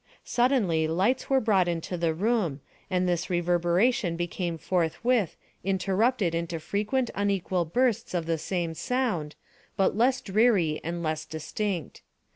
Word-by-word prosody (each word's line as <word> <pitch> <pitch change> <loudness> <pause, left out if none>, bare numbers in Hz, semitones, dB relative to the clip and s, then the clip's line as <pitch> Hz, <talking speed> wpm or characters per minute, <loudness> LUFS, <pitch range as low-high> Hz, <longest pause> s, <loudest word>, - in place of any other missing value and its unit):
Suddenly 220 - +2
lights 190 +11 +1
were 270 -1 +4
brought 200 -6 +2
into 170 +1 -2
the 170 -1 +1
room, 190 - 0 0.3
and 180 -1 +1
this 175 +1 -1
reverberation 175 +3 +2
became 175 0 -3
forthwith 185 +5 0 0.3
interrupted 195 +1 +1
into 170 0 -2
frequent 210 - -1
unequal 195 -3 0
bursts 235 +2 0
of 170 -2 -1
the 165 -1 -1
same 170 0 -2
sound, 205 - -1 0.4
but 195 - +2
less 250 +4 +3
dreary 195 -7 +2
and 170 +1 -3
less 155 -1 -1
distinct. 165 - -4
180 Hz, 130 wpm, -27 LUFS, 165-220 Hz, 0.4 s, were